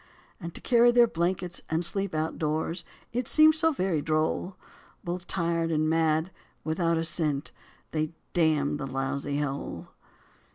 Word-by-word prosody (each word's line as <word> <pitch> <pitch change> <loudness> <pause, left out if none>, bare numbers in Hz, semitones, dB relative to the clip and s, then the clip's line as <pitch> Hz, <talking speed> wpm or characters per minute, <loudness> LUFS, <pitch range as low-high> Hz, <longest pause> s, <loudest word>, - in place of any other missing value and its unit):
And 170 -3 -6
to - - -6
carry 240 -1 +5
their 240 0 +6
blankets 175 -2 -2
and 160 +2 +1
sleep 195 0 -1
outdoors, 160 +2 -2 0.3
it 245 0 -1
seemed 310 0 +6
so 320 +1 +2
very 185 - 0
droll! 160 +4 -1 0.5
Both 175 +1 -4
tired 170 -2 0
and 155 -1 +1
mad, 160 +1 +1 0.3
without 165 +1 0
a 165 - 0
cent, 155 -3 0 0.4
they 155 -1 -1 0.2
damned 155 -4 +2
the 135 - -4
lousy 140 +2 -2
hole. 140 -1 -4
165 Hz, 140 wpm, -28 LUFS, 155-185 Hz, 0.5 s, their